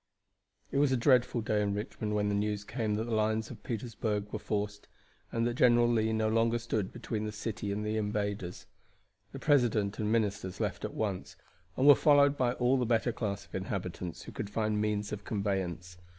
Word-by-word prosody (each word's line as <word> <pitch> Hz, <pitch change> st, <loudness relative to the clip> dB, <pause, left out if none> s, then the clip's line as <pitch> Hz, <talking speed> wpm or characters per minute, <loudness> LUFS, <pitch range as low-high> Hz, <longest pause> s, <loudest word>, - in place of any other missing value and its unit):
It 140 Hz, -, +1 dB
was 145 Hz, -2 st, +4 dB
a 130 Hz, -, +3 dB
dreadful 125 Hz, -1 st, +3 dB
day 105 Hz, -1 st, +1 dB
in 100 Hz, -1 st, 0 dB
Richmond 105 Hz, 0 st, -3 dB
when 105 Hz, 0 st, +1 dB
the 105 Hz, -, 0 dB
news 105 Hz, 0 st, -1 dB
came 110 Hz, -1 st, -2 dB
that 110 Hz, -, -1 dB
the 115 Hz, 0 st, -3 dB
lines 110 Hz, +1 st, 0 dB
of 115 Hz, -, -10 dB
Petersburg 110 Hz, -3 st, -3 dB
were 110 Hz, -, -2 dB
forced, 105 Hz, -1 st, -3 dB, 0.4 s
and 115 Hz, 0 st, 0 dB
that 120 Hz, -, 0 dB
General 120 Hz, -1 st, +5 dB
Lee 110 Hz, -2 st, +2 dB
no 110 Hz, 0 st, +1 dB
longer 115 Hz, +1 st, +2 dB
stood 110 Hz, -4 st, -2 dB
between 115 Hz, -2 st, -4 dB
the 105 Hz, -, -3 dB
city 105 Hz, -1 st, -4 dB
and 105 Hz, +1 st, -2 dB
the 110 Hz, +1 st, -1 dB
invaders. 100 Hz, -4 st, -2 dB, 0.7 s
The -, -, -7 dB
president 120 Hz, -8 st, +2 dB
and 105 Hz, 0 st, 0 dB
ministers 100 Hz, -4 st, -1 dB
left -, -, -2 dB
at -, -, -4 dB
once, 95 Hz, -3 st, -3 dB, 0.4 s
and 130 Hz, -, +2 dB
were 145 Hz, -, +11 dB
followed 145 Hz, 0 st, +5 dB
by 125 Hz, -3 st, +1 dB
all 125 Hz, +2 st, +2 dB
the 125 Hz, -, +1 dB
better 120 Hz, +1 st, +2 dB
class 100 Hz, -3 st, -3 dB
of -, -, -26 dB
inhabitants 90 Hz, -3 st, -4 dB
who -, -, -9 dB
could 100 Hz, -, -5 dB
find 105 Hz, 0 st, 0 dB
means 105 Hz, -1 st, -1 dB
of 105 Hz, -1 st, -5 dB
conveyance. 95 Hz, -4 st, -2 dB
110 Hz, 200 wpm, -31 LUFS, 105-120 Hz, 0.7 s, were